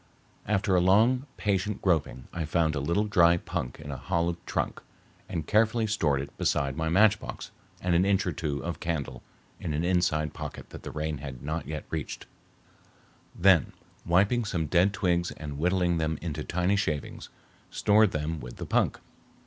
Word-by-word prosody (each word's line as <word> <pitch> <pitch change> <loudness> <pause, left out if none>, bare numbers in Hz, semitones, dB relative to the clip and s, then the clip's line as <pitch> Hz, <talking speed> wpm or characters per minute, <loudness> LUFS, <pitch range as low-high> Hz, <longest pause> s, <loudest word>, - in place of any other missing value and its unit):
After 95 -2 +2
long, 115 +9 +4
patient 100 0 0
groping 70 -8 0
I 85 - -2
found 80 0 +1
a 75 - -1
little 85 +9 +1
dry 85 -5 +4
punk 60 -6 -4
in 75 -2 -7
a 70 - -5
hollow 85 +3 0
trunk - - -2 0.5
and 80 -3 -3
carefully 110 +3 +3
stored 80 -10 +1
it 70 +1 -9
beside 70 -2 +1
my 80 +1 -1
matchbox 105 +4 +2 0.3
and 90 -1 +1
an 85 +2 +4
inch 100 0 +2
or 90 - 0
two 75 -3 -3
of 85 -3 -4
candle 70 -7 -3 0.4
in 80 - -3
an 80 - -1
inside 85 -4 +1
pocket - - -8
that - - -9
the - - -7
rain 75 -2 -3
had 65 -3 -8
not 80 +1 -3
yet 75 0 -5
reached; 80 -3 -4 1.1
then, 90 -4 +4 0.3
wiping 100 +8 +3
some 90 -7 -1
dead 90 +5 +3
twigs 90 -4 0
and 75 -2 -7
whittling 90 0 +2
them 80 -1 -1
into 80 -3 -4
thin 90 +3 0
shavings, 75 -7 -3 0.4
stored 105 0 +4
them 75 -1 -3
with - - -9
the - - -6
punk. - - +1
85 Hz, 170 wpm, -28 LUFS, 75-95 Hz, 1.1 s, long